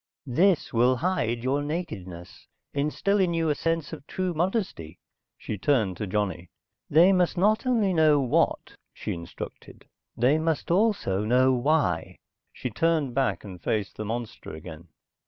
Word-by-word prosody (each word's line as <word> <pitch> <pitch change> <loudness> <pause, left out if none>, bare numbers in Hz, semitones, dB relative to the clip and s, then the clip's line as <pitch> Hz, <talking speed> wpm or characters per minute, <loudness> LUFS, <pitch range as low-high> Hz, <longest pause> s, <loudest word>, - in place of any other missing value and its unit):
"This 170 +7 +2
will 120 +2 +4
hide 120 -8 -1
your 135 +3 +1
nakedness, 110 - -6 0.3
instill 150 +8 0
in 180 -3 +2
you 165 -1 +1
a - - +3
sense 165 +1 -2
of 150 -2 -9
true 185 -1 -2
modesty." 170 - -2 0.4
She 105 - -6
turned 110 -5 +1
to 105 - -4
Johnny. 95 -3 -2 0.4
"They 175 +6 +6
must 180 -1 +1
not 215 +7 +2
only 220 -7 +2
know 155 -3 +4
what," 130 -3 +1 0.2
she - - -4
instructed. 85 0 -9 0.3
"They 130 +6 +3
must 160 0 -1
also 185 - +1
know 130 +4 +4
why." 125 - 0 0.3
She 125 - -5
turned 155 0 +1
back 135 +1 0
and 95 -4 -10
faced 105 0 -2
the 110 - -5
monster 115 -5 -5
again. 80 +1 -10
140 Hz, 150 wpm, -26 LUFS, 105-170 Hz, 0.4 s, They